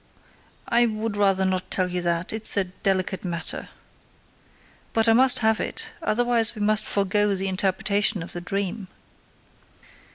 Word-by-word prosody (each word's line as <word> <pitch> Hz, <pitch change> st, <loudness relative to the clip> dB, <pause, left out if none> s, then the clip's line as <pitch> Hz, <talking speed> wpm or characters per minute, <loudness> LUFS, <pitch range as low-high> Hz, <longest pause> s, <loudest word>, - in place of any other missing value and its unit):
"I 240 Hz, 0 st, +3 dB
would 215 Hz, -1 st, -3 dB
rather 195 Hz, -2 st, +2 dB
not 185 Hz, -1 st, -2 dB
tell 185 Hz, -1 st, +1 dB
you 180 Hz, 0 st, -1 dB
that; 170 Hz, +1 st, -2 dB
it 220 Hz, -, -2 dB
is -, -, +3 dB
a 200 Hz, -, +3 dB
delicate 185 Hz, 0 st, -2 dB
matter." 170 Hz, -3 st, -5 dB, 1.2 s
"But 225 Hz, 0 st, +2 dB
I 225 Hz, -, +6 dB
must 255 Hz, +2 st, +4 dB
have 220 Hz, 0 st, +2 dB
it, -, -, -4 dB
otherwise 240 Hz, -3 st, +2 dB
we 215 Hz, -, -7 dB
must 215 Hz, +1 st, +2 dB
forgo 200 Hz, +1 st, +1 dB
the 195 Hz, +1 st, -1 dB
interpretation 195 Hz, +1 st, 0 dB
of 165 Hz, -, -9 dB
the 175 Hz, -, -6 dB
dream." 195 Hz, +2 st, -4 dB
200 Hz, 155 wpm, -24 LUFS, 185-220 Hz, 1.2 s, I